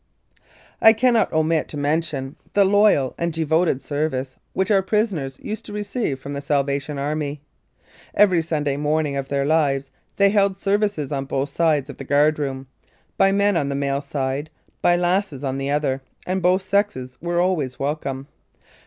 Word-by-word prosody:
I 220 - +8
cannot 235 0 +2
omit 160 0 +1
to 150 - -7
mention 145 -2 -1 0.2
the 200 -1 +5
loyal 200 -9 +4
and 170 0 0
devoted 160 -3 +1
service 140 -3 -2 0.2
which 190 +2 0
our 195 -2 +5
prisoners 190 - -1
used 215 +1 -5
to 205 - -8
receive 205 - -2
from 140 +2 -7
the 140 - -4
Salvation 140 0 -1
Army. 145 0 -3 0.7
Every 190 -5 +5
Sunday 150 -3 -1
morning 150 0 0
of 135 -1 -3
their 140 0 0
lives 140 -3 +1 0.2
they 200 0 +4
held 200 -2 +2
services 200 -7 0
on 135 -1 -2
both 135 +1 -3
sides 155 -5 +2
of 140 - -9
the - - -7
guard 145 +3 +3
room, 135 -2 -3 0.5
by 195 - +4
men 200 0 +2
on 145 -4 0
the 140 - -2
male 140 0 -1
side, 140 +1 -3 0.3
by 175 - +4
lasses 175 -4 0
on 135 0 -2
the 135 0 -2
other, 140 -2 0 0.2
and 185 +1 -1
both 180 +2 +3
sexes 190 -12 -1
were 175 +1 -1
always 170 -8 0
welcome. 140 -2 -3
150 Hz, 170 wpm, -22 LUFS, 140-190 Hz, 0.7 s, I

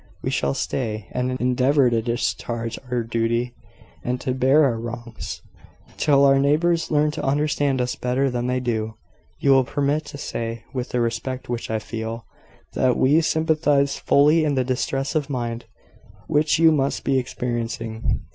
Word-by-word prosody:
We - - -1
shall 70 0 0
stay, 110 -6 -3
and 125 +1 -2
endeavour 125 +1 +3
to 115 -1 +2
discharge 115 0 -2
our 125 -1 0
duty, 115 +2 -1 0.5
and 125 +1 -2
to 130 - -1
bear 130 +4 +4
our 120 -5 +1
wrongs, 115 0 -7 0.5
till 140 -1 +4
our 135 0 +5
neighbours 160 +4 +2
learn 150 -1 +2
to - - -5
understand 145 -1 +1
us 125 0 0
better 125 +2 0
than 120 0 -2
they 125 0 0
do. 110 -3 -2 0.4
"You 140 - +2
will 135 -1 +6
permit 145 +4 -1
to 145 - -8
say, 115 -3 -4
with 125 -2 -3
the 125 - 0
respect 125 +2 -3
which 120 -1 -3
I 110 - 0
feel, 115 +1 -5 0.5
that 130 -1 +2
we 145 +5 +4
sympathise 155 -3 +2
fully 150 +3 +4
in 145 -2 +1
the 130 - +2
distress 135 +2 -1
of 150 -3 -1
mind 120 -3 -3 0.6
which 150 0 +2
you 165 0 +6
must 140 -2 0
be 135 -1 +2
experiencing. 115 -3 -3
130 Hz, 165 wpm, -23 LUFS, 115-140 Hz, 0.6 s, will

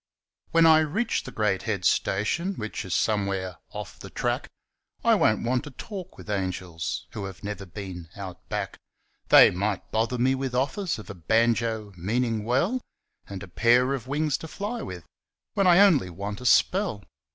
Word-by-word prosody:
When 165 0 +5
I 160 -1 +8
reach 160 +10 0
the - - -7
great 100 -3 0
head 100 -4 -1
station 165 - +1
Which 110 - -5
is 95 - -2
somewhere 100 -4 0
'off - - -8
the - - -9
track' - - -2 0.5
I - - +5
won't - - +3
want 125 +1 0
to - - -7
talk 185 - -8
with - - -12
angels 95 -4 -3
Who 105 -3 -5
have 95 0 -9
never 100 -1 -5
been 90 -2 -8
out 95 -4 -9
back; - - -3 0.5
They - - +9
might 100 +1 -2
bother 115 +3 0
me 130 +2 +3
with 135 -1 -3
offers 155 +8 0
Of 105 -1 -8
a - - -6
banjo 110 +3 +1
meanin' 110 +5 -1
well 155 - +1 0.5
And 100 0 -6
a - - -8
pair 120 +8 +3
of 130 -3 -4
wings 150 +1 0
to 160 - -7
fly 210 +8 -4
with, 90 -3 -7 0.5
When 195 -2 +2
I 175 -1 +7
only 170 - +5
want 100 +5 -6
a 125 - -1
spell. 180 - +3
110 Hz, 175 wpm, -26 LUFS, 95-145 Hz, 0.5 s, They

